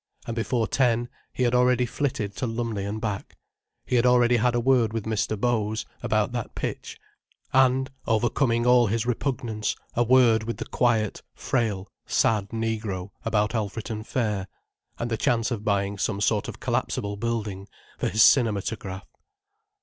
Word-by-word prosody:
And 115 - -4
before 115 0 0
ten 120 -2 +1 0.2
he 125 - -1
had 120 -1 +2
already 125 0 +3
flitted 120 -5 -2
to 130 - -1
Lumley 115 -3 -3
and 105 +2 -3
back, 105 -3 -4 0.5
he 125 - +1
had 120 - +3
already 125 -1 +4
had 120 +1 +2
a - - +2
word 120 -3 +3
with 115 -2 -3
Mr. 110 -1 -1
Bows, 110 -2 0 0.2
about - - +1
that - - -5
pitch, - - -5 0.5
and, 130 +1 +3 0.2
overcoming 120 +1 +1
all 125 -1 +5
his 115 +3 0
repugnance, 120 -3 -2 0.2
a 120 - +2
word 120 -2 +5
with 115 - -3
the - - -5
quiet, 115 -4 +1
frail, 105 -6 -1 0.2
sad 105 -3 +2
negro, 110 -4 -3
about 110 -1 +1
Alfreton 110 0 -3
fair, 105 -5 -1 0.5
and 120 0 -3
the 115 - 0
chance 115 +1 +1
of 110 -3 -3
buying 100 -1 0
some 100 0 -1
sort 105 0 +1
of - - -7
collapsible 100 0 -1
building, 105 -3 -3 0.3
for - - 0
his 110 -1 +4
cinematograph. 105 -5 +2
115 Hz, 155 wpm, -25 LUFS, 105-120 Hz, 0.5 s, all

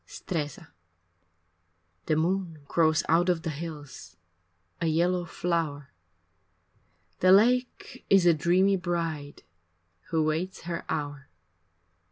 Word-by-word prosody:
X - - -14
Stresa 150 -6 -4 1.4
The 155 - +2
moon 165 -1 -1
grows 160 -1 +2
out 170 +3 +3
of 170 -3 0
the 165 - -2
hills 145 - -8 0.6
A 165 - +1
yellow 175 +3 +1
flower, 165 - -3 1.3
The 185 - +5
lake 250 +5 +2
is 195 -2 +5
a 170 - +6
dreamy 185 +5 +3
bride 165 -5 -4 0.7
Who 160 -1 +1
waits 160 +5 -2
her 170 0 -5
hour. 145 -3 -4
165 Hz, 110 wpm, -27 LUFS, 155-180 Hz, 1.4 s, a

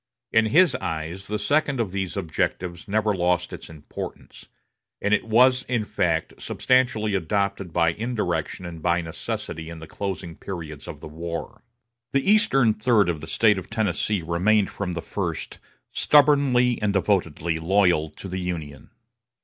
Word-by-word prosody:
In 110 0 +4
his 175 +9 +5
eyes, 80 +4 -5
the 105 - -1
second 140 +5 +1
of 110 -5 -1
these 95 0 -3
objectives 85 0 -2
never 105 +1 +1
lost 90 -1 0
its - - -9
importance; 80 -2 -9 0.5
and 105 - +1
it - - +2
was 125 +3 +5
in 120 -4 0
fact 90 -7 -1
substantially 125 -5 +1
adopted 100 0 -1
by 85 0 +3
indirection 110 -3 -2
and 85 -2 -7
by 85 +1 +2
necessity 80 0 -5
in 85 - -8
the 80 - -9
closing 95 -2 -5
periods 80 -7 -7
of - - -8
the - - -7
war. 85 +7 -6 0.5
The 135 +4 +1
eastern 135 - +4
third 105 -4 +3
of 80 -3 -2
the 80 - -8
State 105 +1 +3
of 95 - -11
Tennessee 105 -3 0
remained 95 +5 +2
from 90 -3 -4
the 85 - -4
first - - -4 0.3
stubbornly 140 -4 +4
and 105 -1 +1
devotedly 85 -5 0
loyal 90 -2 +2
to 75 +5 -10
the 95 0 -4
Union. 80 -6 -5
95 Hz, 155 wpm, -24 LUFS, 85-110 Hz, 0.5 s, his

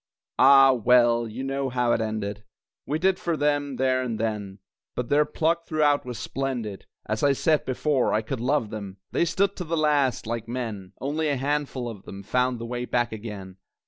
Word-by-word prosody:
Ah, 135 0 +8
well 120 -1 +4
you 115 +4 -6
know 135 0 -2
how 125 -1 +1
it 115 - +2
ended 105 -1 -3 0.4
We 150 - 0
did 185 +3 +2
for 170 -2 -1
them, 145 -2 0
there 130 0 +1
and 115 -4 -3
then, 105 -3 -3 0.4
But 125 -1 -3
their 150 +1 +4
pluck 165 +2 0
throughout 150 -3 +2
was 125 -2 -5
splendid. 120 -4 -4 0.2
(As 110 0 -2
I 140 -1 +4
said 155 +2 +1
before, 135 0 +1
I 110 - +1
could 130 +3 -4
love 125 -3 0
them!) 100 -3 -7
They - - +2
stood 195 +4 +1
to 180 - -3
the 165 0 -2
last, 145 -6 +2
like 115 0 -4
men 110 -6 -5
Only 155 +3 -1
a 140 - 0
handful 140 -2 -2
of 110 -5 -7
them 100 0 -9
Found 125 +4 +1
the 115 - -6
way 120 +1 -3
back 120 -1 0
again. 105 -4 -7
125 Hz, 195 wpm, -25 LUFS, 110-145 Hz, 0.4 s, Ah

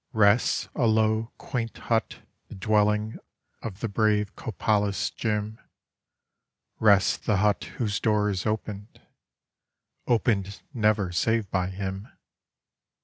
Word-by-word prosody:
Rests 105 +1 +3
a 125 -5 +1
low, 110 +1 +2
quaint 115 -3 -4
hut, 115 -1 -2 0.2
the - - -10
dwelling 105 +2 +1 0.4
of 105 -3 -7
the 115 - 0
brave 105 -1 +1
Copalis 105 -2 0
Jim 110 0 -2 0.6
— - - -54
Rests 100 -3 +4
the 105 - 0
hut 105 +1 +2
whose 105 -5 -1
door 105 -1 +2
is 95 +1 -2
opened 105 0 -4 0.6
— - - -53
opened 105 -4 0
never 105 -5 +1
save 110 +3 0
by 90 -1 0
him. 95 +1 -5
105 Hz, 120 wpm, -26 LUFS, 100-110 Hz, 0.6 s, Rests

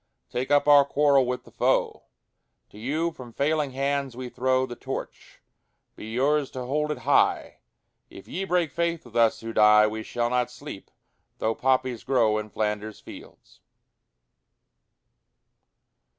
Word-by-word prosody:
Take 125 +2 -3
up 145 0 +3
our 145 -1 +8
quarrel 140 -2 +3
with 125 0 -3
the - - -17
foe: - - 0 0.7
To 105 - -13
you 155 +8 -1
from 125 -6 -12
failing 150 +2 0
hands 140 -1 -2
we 130 -1 -6
throw 130 +1 +1
The 120 - -8
Torch: - - -8 0.5
be - - -9
yours 140 +5 +1
to 125 - -4
hold 150 +4 -1
it 150 - -3
high! - - +2 0.5
If 95 - -13
ye 190 - -4
break 175 -5 0
faith 170 -2 -2
with 120 -1 -15
us 115 -2 +3
who 115 0 -6
die 105 0 +6
We 110 +1 -3
shall 120 +1 -2
not 125 -1 +1
sleep, 125 -4 -10 0.5
though 110 - 0
poppies 130 -1 0
grow 115 -5 +2
In 105 0 -7
Flanders 105 0 -3
fields. - - -14
130 Hz, 150 wpm, -25 LUFS, 115-145 Hz, 0.7 s, our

